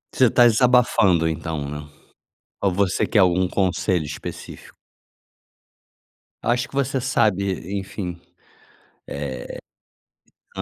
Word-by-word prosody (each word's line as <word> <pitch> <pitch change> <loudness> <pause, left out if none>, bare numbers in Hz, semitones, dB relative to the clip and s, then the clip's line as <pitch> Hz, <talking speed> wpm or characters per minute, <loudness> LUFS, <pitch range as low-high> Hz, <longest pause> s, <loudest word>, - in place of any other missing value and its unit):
Você 130 - +5
está 120 +1 +5
desabafando 115 -8 +4
então, 80 -2 -3
né. 75 +1 -7 0.8
Ou 100 - +3
você 95 0 +1
quer 110 - +1
algum 90 -1 +3
conselho 95 -3 0
específico? 75 -1 -8 1.7
Acho 120 +1 +1
que - - -13
você 135 -1 0
sabe, 100 -7 0
enfim. 90 -2 -6 2.4
Eh - - -3
95 Hz, 95 wpm, -22 LUFS, 85-120 Hz, 2.4 s, Você